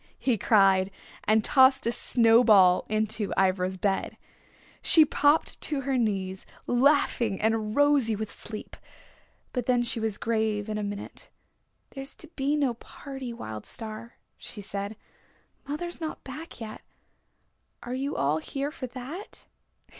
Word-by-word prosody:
he 255 -3 +1
cried 195 -3 +4 0.4
and 215 0 +3
tossed 265 0 +5
a 235 - +2
snow 230 -1 +4
ball 190 -6 +6
into 215 -1 -1
Ivra's 185 0 +1
bed. 195 +1 -1 0.6
She 315 -2 +6
popped 290 +2 +2
to 290 -3 -1
her 270 0 -1
knees, 195 -5 -1 0.2
laughing 245 -5 +2
and 220 0 0
rosy 285 -6 +3
with 215 0 -5
sleep. 215 -1 -8 0.8
But 250 -3 -2
then 245 -1 +3
she 235 -1 -1
was 220 -2 -2
grave 220 -2 -1
in 215 0 -2
a - - -3
minute. 205 0 -6 0.6
"There's 270 0 -7
to 320 - -9
be 285 -2 -1
no 280 -5 +1
party, 265 +2 -8
Wild 110 - -7
Star," 225 +1 -8 0.2
she 215 - -7
said. 200 +1 -5 0.7
"Mother's 345 +5 -4
not 315 -1 -5
back 295 +3 -9
yet. 220 -2 -7 1.0
Are 245 - -5
you 275 +3 -2
all 145 +3 +1
here 275 - -4
for 260 -4 -6
that?" 270 - -8
230 Hz, 140 wpm, -27 LUFS, 210-270 Hz, 1.0 s, ball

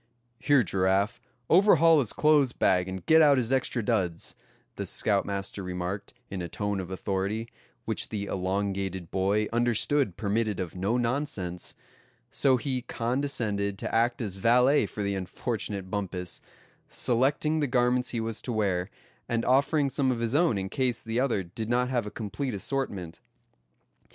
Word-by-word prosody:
"Here, 145 -4 +4
Giraffe, 95 +4 +1 0.3
overhaul 165 -4 +6
his 125 -7 0
clothes 150 -4 +3
bag, 90 0 +2
and 95 0 -6
get 160 0 +6
out 145 -3 +6
his 125 0 0
extra 130 -2 0
duds," 95 -7 -1 0.4
the - - -4
scoutmaster 100 0 -1
remarked, 90 +2 -4 0.2
in 95 -2 -4
a 85 - -5
tone 105 +2 -2
of 95 -1 -5
authority, 100 +4 -2 0.4
which - - -2
the 105 -2 -3
elongated 95 -2 -2
boy 100 +3 +1
understood 120 -1 +2
permitted 105 -1 -1
of 90 -1 -4
no 100 +6 0
nonsense; 115 - -3 0.6
so 135 -2 +3
he 130 0 -2
condescended 115 -5 -2
to - - -5
act 120 +2 +1
as 100 -3 -5
valet 125 +4 +4
for 105 - -5
the 100 0 -1
unfortunate 100 0 -4
Bumpus, 90 -3 -4 0.5
selecting 140 +6 +1
the 145 - +1
garments 125 0 +2
he 120 - -2
was 115 0 -3
to 125 - -4
wear, 95 -5 0 0.4
and 115 0 0
offering 140 +3 +3
some 135 -1 +1
of 120 - -2
his 115 +1 -1
own 150 - +3
in 95 0 -2
case 125 -2 0
the 115 +1 -2
other 125 -7 +1
did 105 +6 -6
not 125 +1 +1
have 120 -4 -1
a - - -3
complete 115 +4 -4
assortment. 100 - -3
110 Hz, 155 wpm, -28 LUFS, 95-130 Hz, 0.6 s, overhaul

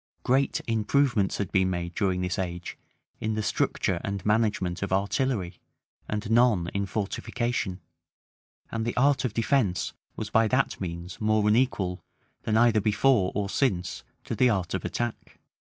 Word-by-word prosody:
Great 135 +2 +2
improvements 115 -1 +1
had 100 -1 -3
been 95 -1 +3
made 85 -1 -3
during 95 -3 0
this 90 0 -2
age 90 -1 -4 0.4
in 110 0 -1
the 110 - -1
structure - - 0
and 100 -1 -4
management 105 -5 +1
of 100 - -3
artillery, 100 -1 0 0.5
and 105 +1 -3
none 115 -8 +3
in 100 0 -1
fortification; 105 0 -2 0.9
and 115 -1 -2
the 115 +2 -3
art 140 +2 +3
of 125 - 0
defence 115 -6 +1 0.2
was 110 -1 -5
by 115 0 +4
that 130 0 0
means 85 +1 -6
more 110 -1 +2
unequal, 105 -6 +1 0.4
than 110 0 +1
either 115 -2 +4
before 105 -1 +3
or 100 -1 0
since, 95 -5 -1 0.2
to - - -4
the 125 - +4
art 95 -5 -1
of 95 - -2
attack. 120 -1 -4
105 Hz, 150 wpm, -27 LUFS, 95-120 Hz, 0.9 s, by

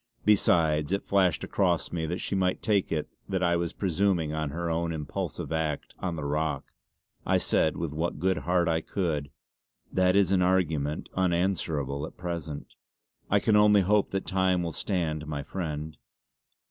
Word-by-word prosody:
Besides 80 -7 +3
it 100 - -1
flashed 95 -5 +2
across - - 0
me 80 -2 -2
that 90 +3 -2
she - - -3
might 95 -1 0
take 105 -4 +1
it 75 -2 -1 0.2
that 95 -2 0
I 85 -1 +3
was 85 -1 -1
presuming 90 -4 0
on 80 -1 -2
her 85 +4 -3
own 85 0 -1
impulsive 75 0 -4
act 80 -2 -2
on 90 -2 -2
the 75 -3 -4
rock. 75 +2 -1 0.6
I - - +2
said 80 - +1
with 85 -3 -3
what 80 +1 -2
good 95 +4 +1
heart 90 -1 +1
I 80 -1 +1
could: 80 -7 -2 0.6
"That 90 0 +3
is 100 -2 +4
an 95 -2 +3
argument 80 -5 +1
unanswerable, 85 -6 0
at - - -15
present. 85 -4 -5 0.6
I 105 - +4
can 110 +1 +2
only 105 -1 +6
hope 100 +2 +2
that 95 0 -2
time 95 -2 +1
will 85 - -2
stand 80 -6 -2
my 75 -2 -3
friend. 80 -3 -4
85 Hz, 170 wpm, -28 LUFS, 80-95 Hz, 0.6 s, only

